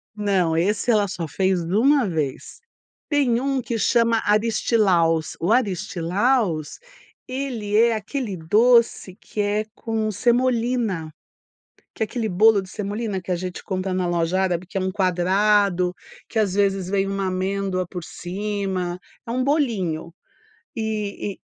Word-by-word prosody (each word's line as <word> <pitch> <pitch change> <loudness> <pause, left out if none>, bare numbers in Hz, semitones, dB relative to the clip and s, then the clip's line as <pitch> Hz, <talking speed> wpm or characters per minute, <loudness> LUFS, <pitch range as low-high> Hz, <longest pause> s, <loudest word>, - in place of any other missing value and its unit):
Não, 190 -6 +1
esse 210 +7 +1
ela 205 -2 +3
só 180 -2 -4
fez 185 +1 0
1 230 - +3
vez. 155 -6 -3 0.5
Tem 270 -6 +2
um 270 0 0
que 235 -1 -3
chama 230 +1 +2
aristilaus. 205 -6 +2
O 170 +6 0
aristilaus 195 - 0 0.5
ele 250 -6 -2
é 230 0 +4
aquele 220 0 -4
doce 220 +2 +3
que 210 - -10
é 205 +1 0
com 220 -1 -2
semolina, 235 -6 0 0.8
que - - -2
é - - +1
aquele 220 +1 -3
bolo 210 +2 +5
de 190 - -12
semolina 205 0 -3
que 180 - -6
a - - +2
gente 180 +1 -5
compra 185 -1 -2
na 185 -1 0
loja 175 +1 0
árabe, 180 -2 0
que 195 - -5
é - - 0
um 190 0 -1
quadrado, 185 0 +2 0.4
que 225 - -1
às 205 -4 +1
vezes 195 -2 +1
vem 195 0 +1
uma 195 -1 -2
amêndoa 185 0 -1
por 180 0 -6
cima, 190 -1 -3 0.3
é - - -3
um 255 +2 0
bolinho. 210 - -1 0.6
E-e, 210 -3 -3
200 Hz, 140 wpm, -23 LUFS, 185-225 Hz, 0.8 s, bolo